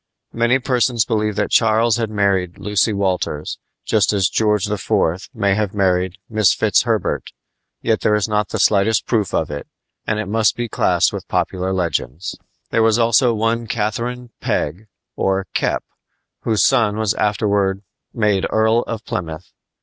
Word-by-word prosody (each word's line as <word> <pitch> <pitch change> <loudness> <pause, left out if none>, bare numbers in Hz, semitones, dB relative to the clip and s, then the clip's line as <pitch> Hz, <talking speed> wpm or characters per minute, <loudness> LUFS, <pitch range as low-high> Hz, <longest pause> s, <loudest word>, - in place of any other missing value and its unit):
Many 120 +2 +2
persons 125 -3 +1
believe 105 -2 -1
that 105 0 -1
Charles 115 0 +3
had 115 -2 -1
married 100 -4 0
Lucy 105 +2 +1
Walters, 95 -6 -2 0.3
just 105 -4 +2
as 95 -2 +2
George 105 -2 +1
IV. 95 -3 -1
may 100 -6 +1
have 105 -1 -1
married 95 -2 +1
Mrs. 110 -3 +3
Fitzherbert; - - 0 0.5
yet 110 -1 +1
there 105 - +3
is 105 0 0
not 105 -1 0
the - - -3
slightest 105 +2 +2
proof 110 -6 0
of - - -1
it, 75 - -6 0.4
and 110 - 0
it 110 - -2
must 110 +2 +1
be 120 0 -3
classed - - +2
with - - -6
popular 95 0 -1
legends. 85 -3 -2 0.4
There 115 - +2
was 110 0 +4
also 115 +1 +3
one 115 +1 0
Catherine 120 +3 -3
Peg, 90 +9 -2 0.3
or 95 0 0
Kep, - - 0 0.6
whose 110 -4 +2
son 105 -3 +2
was 110 -2 +1
afterward 100 -2 0 0.3
made 105 -4 +1
Earl 110 +1 +3
of 115 -1 -5
Plymouth. 80 -1 -5
105 Hz, 155 wpm, -19 LUFS, 95-115 Hz, 0.6 s, was